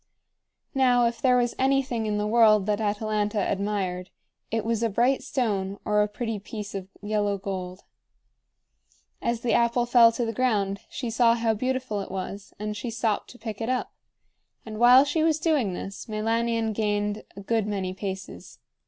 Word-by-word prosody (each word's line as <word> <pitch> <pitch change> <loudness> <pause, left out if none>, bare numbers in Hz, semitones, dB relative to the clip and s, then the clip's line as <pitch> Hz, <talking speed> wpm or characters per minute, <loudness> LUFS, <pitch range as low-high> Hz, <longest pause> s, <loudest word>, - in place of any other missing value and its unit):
Now, 250 -3 +4
if 235 -1 -2
there 250 -1 +4
was 240 -1 +1
anything 265 -4 +1
in 210 -1 0
the 210 - -1
world 215 -2 +5
that 210 +1 0
Atalanta 210 0 -1
admired, 195 -2 -2 0.4
it 225 -1 -2
was 230 -1 0
a 230 - +1
bright 245 +6 +2
stone 205 -8 -1
or 210 0 +3
a 210 - +2
pretty 225 0 -4
piece 205 0 -7
of 195 -2 -5 0.2
yellow 205 -1 0
gold. 185 -1 -6 1.4
As 235 -1 -1
the 240 - 0
apple 235 0 +2
fell 240 -1 +6
to 240 - -1
the 225 - -3
ground 205 -6 0
she 240 -4 -4
saw 230 0 +4
how 230 -1 +1
beautiful 255 -2 -2
it - - -7
was, 195 +1 -6
and 210 0 -4
she 235 +3 -4
stopped 225 -2 -1
to 245 - -13
pick 220 -1 -6
it 225 - -2
up; 255 -1 -1 0.7
and 215 -1 -7
while 250 +3 +8
she 290 +3 0
was 315 -1 +3
doing 300 - +1
this, 195 +2 -7
Meilanion 225 +1 0
gained 210 0 -1
a 200 - -8
good 220 +1 0
many 190 -3 -2
paces. 190 0 -7
220 Hz, 175 wpm, -26 LUFS, 205-240 Hz, 1.4 s, while